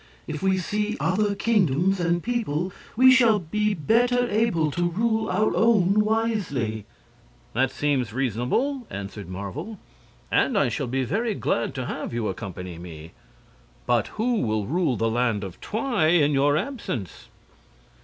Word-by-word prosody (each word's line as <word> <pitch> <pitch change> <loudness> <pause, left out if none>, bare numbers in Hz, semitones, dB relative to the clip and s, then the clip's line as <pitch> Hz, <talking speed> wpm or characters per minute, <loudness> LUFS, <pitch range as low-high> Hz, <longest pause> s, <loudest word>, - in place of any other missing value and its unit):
If 155 -1 -5
we 190 0 +2
see 210 +4 -2
other 200 +5 +1
kingdoms 195 - +2
and 175 0 0
people 190 -8 -2 0.2
we 260 +3 +7
shall 235 -4 +5
be 210 +4 -1
better 245 +8 +2
able 205 -8 +1
to 175 +3 0
rule 220 +4 0
our 215 - +1
own 210 -3 +4
wisely." 205 - -1 0.7
"That 130 +2 +2
seems 130 -4 -1
reasonable," 135 - -1
answered 100 -1 -7
Marvel, 125 - -6 0.5
"and 245 - +2
I 140 -10 +3
shall 130 +3 -3
be 130 +2 -1
very 220 - -1
glad 115 - -1
to 130 -2 -3
have 115 - -5
you 115 -2 -1
accompany 90 -3 -6
me. 80 -2 -10 0.7
But 120 -3 +2
who 235 +1 +1
will 110 -3 -1
rule 155 - 0
the 115 - +1
Land 115 -2 0
of 95 -3 -8
Twi 220 - 0
in 160 -3 +4
your 145 +1 +3
absence?" 155 - -5
170 Hz, 145 wpm, -25 LUFS, -, 0.7 s, we